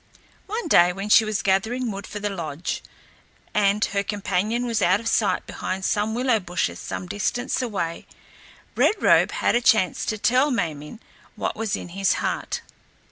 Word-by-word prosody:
One 430 -2 -3
day, 175 - +6
when 195 +3 -5
she 220 - +7
was 215 -1 -2
gathering 220 +6 0
wood 200 0 -7
for 210 - -6
the 205 0 -2
lodge, 165 -3 -4 0.7
and 210 +1 +3
her 200 0 -1
companion 205 +3 -1
was 230 -3 -1
out 185 +2 +4
of 230 - -6
sight 225 -2 +1
behind 190 0 -4
some 210 +1 0
willow 250 -2 +2
bushes 175 - -2
some 95 0 -5
distance 240 - -2
away, 195 -9 -3 0.7
Red - - +3
Robe - - +5
had - - 0
a 240 - +2
chance 220 -7 +3
to 215 - -2
tell 255 +7 +3
Ma 245 -8 +1
min´ 150 +9 -10 0.4
what - - -3
was 220 -2 -1
in - - -7
his 195 +2 +1
heart. - - -2
205 Hz, 175 wpm, -24 LUFS, 185-230 Hz, 0.7 s, she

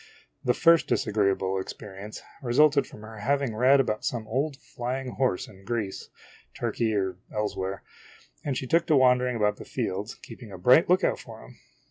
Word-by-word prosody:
The 125 - +2
first 165 +1 +5
disagreeable 95 -2 +1
experi 100 -2 -9
ence 105 +1 -8 0.2
resulted 140 +3 +4
from - - -13
her 110 0 -10
having 135 +2 0
read 130 +5 +5
about 110 -5 0
some 115 -3 -2
old 135 +5 -1
fly 125 0 -4
ing 130 - -6
horse 125 -9 0
in 95 -1 -16
Greece, 110 -4 -3 0.5
Turkey, 115 -2 -1
or 95 -3 -1
elsewhere, 100 -2 -3 0.6
and 140 -3 -2
she 130 - -3
took 165 +6 +2
to 155 - +4
wandering 125 -1 +4
about 105 -2 +1
the - - -9
fields 100 +5 -3
keeping 115 -5 -12
a 95 - -8
bright 125 - +5
lookout 185 +2 +3
for - - -11
him - - -16
120 Hz, 175 wpm, -27 LUFS, 105-135 Hz, 0.6 s, first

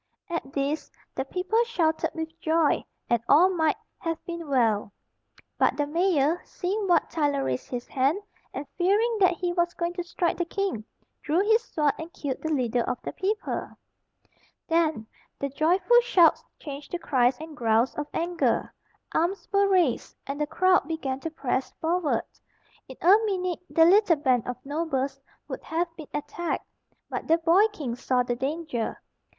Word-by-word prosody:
At 295 -5 -4
this, 285 +2 -1 0.2
the 265 - -2
people 375 +10 +1
shouted 325 -8 0
with 320 0 -5
joy, 320 -1 +2 0.2
and 235 -2 +2
all 340 +6 +7
might 320 -4 +2 0.2
have 330 -2 -2
been 340 -2 -6
well; 225 -6 +2 0.7
but - - +3
the 290 - +1
mayor, 330 0 +2
seeing 395 +3 -3
Wat 345 -3 +3
Tyler 290 -4 +1
raise 125 0 -2
his 245 -1 -4
hand, 275 +8 +1 0.3
and 280 - -5
fearing 425 +6 +2
that 370 -2 +5
he 350 0 -2
was 345 -1 0
going 340 0 -2
to 355 0 -3
strike 345 0 -1
the 345 - +1
king, 380 - -2 0.4
drew 315 +5 +1
his 445 +3 +3
sword, 300 -2 +1
and 320 +1 -7
killed 275 -3 -4
the 315 - -2
leader 245 -4 +1
of 250 +1 -2
the - - -4
people. 415 +3 -2 0.9
Then 320 -8 +1 0.3
the 280 - -2
joyful 365 - +4
shouts 370 -9 +4
changed 285 -2 -8
to - - +1
cries 255 -6 +2
and 315 -1 -8
growls 230 -1 +2
of 295 0 -4
anger. 345 +1 0 0.4
Arms 350 +5 0
were 400 0 +4
raised, 360 -10 +1
and 280 +2 -4
the 300 - +1
crowd 370 -2 +3
began 280 -5 -3
to 325 - -4
press 270 -4 -2
forward. 330 -1 0 0.6
In 260 - -11
a 355 - +7 0.2
minute 365 -3 -1
the 325 - +5
little 380 0 +5
band 260 -6 +1
of 250 -1 -3
nobles 280 -3 -2 0.3
would - - -6
have 335 +1 -2
been 310 -4 -10
attacked, 295 +4 -3 0.4
but - - -5
the 330 - +5
boy 345 +6 +4
king 295 - -5
saw 250 0 +1
the 245 0 -2
danger. 270 -2 -3
320 Hz, 165 wpm, -26 LUFS, 275-355 Hz, 0.9 s, all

